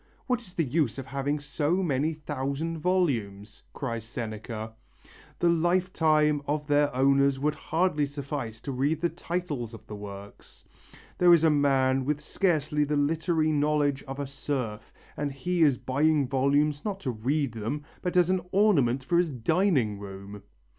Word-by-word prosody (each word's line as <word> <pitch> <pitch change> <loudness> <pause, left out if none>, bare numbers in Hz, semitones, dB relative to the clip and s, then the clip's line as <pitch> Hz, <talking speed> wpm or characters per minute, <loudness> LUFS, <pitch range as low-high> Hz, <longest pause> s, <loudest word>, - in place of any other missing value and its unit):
"What 250 -2 0
is 185 -6 -16
the 165 - +2
use 145 -3 0
of 135 - -5
having 140 +2 -2
so 150 +5 -1
many 150 -1 +1
thousand 150 +2 -3
volumes," 115 - -1
cries 115 -5 -4
Seneca, 110 -1 -6 0.6
"the 175 - +2
lifetime 165 -3 +2
of 150 0 -1
their 145 0 +2
owners 140 +1 +3
would 150 +2 +1
hardly 160 -3 0
suffice 140 -5 -5
to 140 - -5
read 140 +5 0
the 170 - +1
titles 150 -13 -4
of - - -14
the 105 - -8
works.... 100 0 -11 0.5
There 175 -1 +7
is 165 - +1
a 160 - +5
man 135 -2 +2
with 150 +2 -1
scarcely 150 -3 0
the 145 0 0
literary 155 +2 +1
knowledge 145 -2 +1
of 135 +1 -6
a 140 - -2
serf, 130 -6 -4 0.2
and 145 -1 -2
he 175 +6 -2
is 145 -5 +5
buying 145 +1 +1
volumes, 145 +3 +1
not 200 -2 -3
to 130 - -2
read 135 +5 -1
them, 115 +7 -4 0.2
but 180 0 -1
as 180 0 +4
an 185 -1 +1
ornament 145 - +3
for 170 +6 +2
his 175 -2 +2
dining 130 - +1
room! 100 0 -9
145 Hz, 160 wpm, -27 LUFS, 130-160 Hz, 0.6 s, There